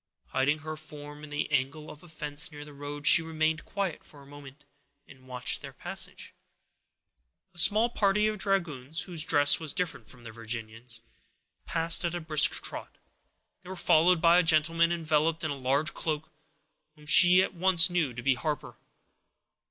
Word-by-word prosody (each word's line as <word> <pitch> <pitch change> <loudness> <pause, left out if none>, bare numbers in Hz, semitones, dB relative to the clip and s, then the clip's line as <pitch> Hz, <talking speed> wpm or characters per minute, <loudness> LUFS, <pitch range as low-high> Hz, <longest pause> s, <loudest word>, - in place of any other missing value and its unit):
Hiding 140 +3 0
her 155 0 -5
form 150 -1 -11
in 150 - -10
the 145 +1 -4
angle 145 +2 -2
of 150 - -14
a 175 - -16
fence 150 +1 -4
near 145 -1 -10
the 150 - -13
road, 145 +1 -8
she 160 - +7
remained 160 -1 -2
quiet 195 -5 -4
for 145 -2 -17
a - - -18
moment, 140 0 -14 0.4
and 130 -1 -18
watched 125 -3 -2
their - - -10
passage. - - -7 1.2
A 170 - -4
small 210 +6 +6
party 210 -2 +1
of 215 -1 -2
dragoons, 160 -7 -2
whose 170 -4 -1
dress 145 -5 +4
was 160 -3 -3
different 180 -2 -4
from 125 -3 -15
the 115 - -10
Virginians, 115 0 -6 0.7
passed 165 +1 +2
at 170 0 -2
a - - -3
brisk 155 -3 +4
trot. - - -8 0.6
They 185 - -14
were 190 - -6
followed 175 0 +3
by 170 +1 +5
a - - +5
gentleman, 165 0 +2
enveloped 160 -1 0
in 155 - -2
a - - -4
large 140 +4 -1
cloak, 155 -1 -4 0.6
whom 150 -1 -18
she 180 +4 +7
at - - -4
once 185 0 +4
knew 165 -7 0
to 120 0 -9
be 135 +1 +3
Harper. 150 +3 -5
155 Hz, 175 wpm, -28 LUFS, 145-170 Hz, 1.2 s, she